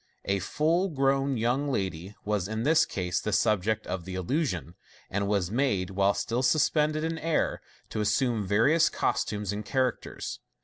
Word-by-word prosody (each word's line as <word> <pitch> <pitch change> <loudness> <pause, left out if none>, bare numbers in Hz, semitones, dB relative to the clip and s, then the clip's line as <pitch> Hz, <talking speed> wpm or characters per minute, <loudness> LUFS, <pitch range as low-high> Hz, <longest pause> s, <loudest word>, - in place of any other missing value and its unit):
A 100 0 +1
full 165 - +1
grown 135 -2 +1
young 125 +5 0
lady 95 -3 -3
was 105 -3 0
in 110 +1 -3
this 155 +4 +4
case 90 -2 -2
the 105 - -2
subject 105 +1 +1
of 90 -1 -4
the 95 +1 -6
illusion, 95 - -1 0.4
and 100 +1 0
was 100 -3 0
made, 105 -7 0
while 100 +1 +2
still 120 +1 -1
suspended 155 +2 +2
in 165 0 -2
air, 165 -1 0 0.3
to 110 - -2
assume 110 +1 +1
various 140 - +4
costumes 105 -1 -1
and 105 +1 -4
characters. 130 +1 -2
110 Hz, 160 wpm, -28 LUFS, 100-140 Hz, 0.4 s, this